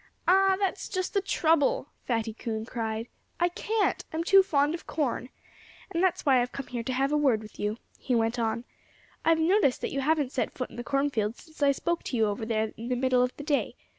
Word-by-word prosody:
"Ah! 385 Hz, +1 st, +5 dB
That's 390 Hz, -1 st, -2 dB
just 370 Hz, -2 st, -2 dB
the 400 Hz, -, +2 dB
trouble!" 320 Hz, -7 st, +2 dB, 0.2 s
Fatty 225 Hz, -2 st, -1 dB
Coon 220 Hz, -1 st, -4 dB
cried. 225 Hz, -1 st, -3 dB, 0.3 s
"I 345 Hz, +1 st, +3 dB
can't! 425 Hz, +4 st, 0 dB
I'm 320 Hz, +1 st, -2 dB
too 390 Hz, +2 st, +7 dB
fond 295 Hz, -5 st, +2 dB
of 335 Hz, -, -7 dB
corn. 260 Hz, -4 st, -2 dB, 0.6 s
And 335 Hz, -, 0 dB
that's 370 Hz, -3 st, +1 dB
why 265 Hz, -3 st, +5 dB
I've 245 Hz, -, -2 dB
come 275 Hz, -, -5 dB
here 250 Hz, -2 st, -4 dB
to 255 Hz, +3 st, -3 dB
have 270 Hz, +2 st, +1 dB
a 300 Hz, -, +3 dB
word 270 Hz, -7 st, +3 dB
with 215 Hz, -1 st, -13 dB
you," 210 Hz, +2 st, -1 dB, 0.2 s
he 250 Hz, -, 0 dB
went 225 Hz, +1 st, +1 dB
on. 230 Hz, +1 st, -1 dB, 0.6 s
"I've 330 Hz, 0 st, +4 dB
noticed 325 Hz, -4 st, +3 dB
that -, -, -3 dB
you 275 Hz, -, -1 dB
haven't 295 Hz, -2 st, +1 dB
set 260 Hz, -, -2 dB
foot 255 Hz, -, -4 dB
in -, -, -12 dB
the 240 Hz, -, -4 dB
cornfield 240 Hz, -5 st, 0 dB
since 315 Hz, -2 st, -16 dB
I 285 Hz, -1 st, +5 dB
spoke 340 Hz, +5 st, -1 dB
to 250 Hz, -, -2 dB
you 220 Hz, -, +4 dB
over 210 Hz, +1 st, -2 dB
there 220 Hz, -1 st, 0 dB
in 230 Hz, +2 st, -6 dB
the 250 Hz, -, +1 dB
middle 255 Hz, 0 st, +2 dB
of 250 Hz, 0 st, 0 dB
the 290 Hz, -, -7 dB
day. 290 Hz, -1 st, 0 dB
270 Hz, 225 wpm, -28 LUFS, 230-325 Hz, 0.6 s, too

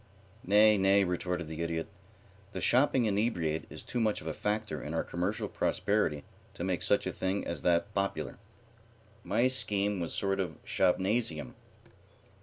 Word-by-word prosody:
"Nay, 105 Hz, +1 st, +5 dB
nay," 100 Hz, +1 st, +5 dB
retorted 90 Hz, -1 st, -2 dB
the 80 Hz, +1 st, -5 dB
Idiot. 80 Hz, -1 st, -2 dB, 0.7 s
"The 95 Hz, -, -3 dB
shopping 125 Hz, +5 st, +3 dB
inebriate 100 Hz, -7 st, 0 dB
is -, -, -9 dB
too 125 Hz, -, -3 dB
much 110 Hz, -2 st, +1 dB
of -, -, -12 dB
a 80 Hz, -, -2 dB
factor 105 Hz, -6 st, -2 dB
in 75 Hz, +2 st, -5 dB
our -, -, +1 dB
commercial 90 Hz, +5 st, -2 dB
prosperity 90 Hz, -9 st, 0 dB, 0.3 s
to -, -, -5 dB
make -, -, -1 dB
such -, -, +2 dB
a -, -, -2 dB
thing 95 Hz, +2 st, -2 dB
as 85 Hz, -5 st, -3 dB
that 90 Hz, +5 st, +1 dB
popular. 100 Hz, 0 st, -2 dB, 0.8 s
My 115 Hz, +5 st, +2 dB
scheme 105 Hz, -6 st, 0 dB
was 85 Hz, -2 st, -3 dB
a -, -, -1 dB
sort 95 Hz, -1 st, 0 dB
of 85 Hz, -6 st, -2 dB
shopnasium." 90 Hz, -, 0 dB
95 Hz, 160 wpm, -31 LUFS, 85-105 Hz, 0.8 s, Nay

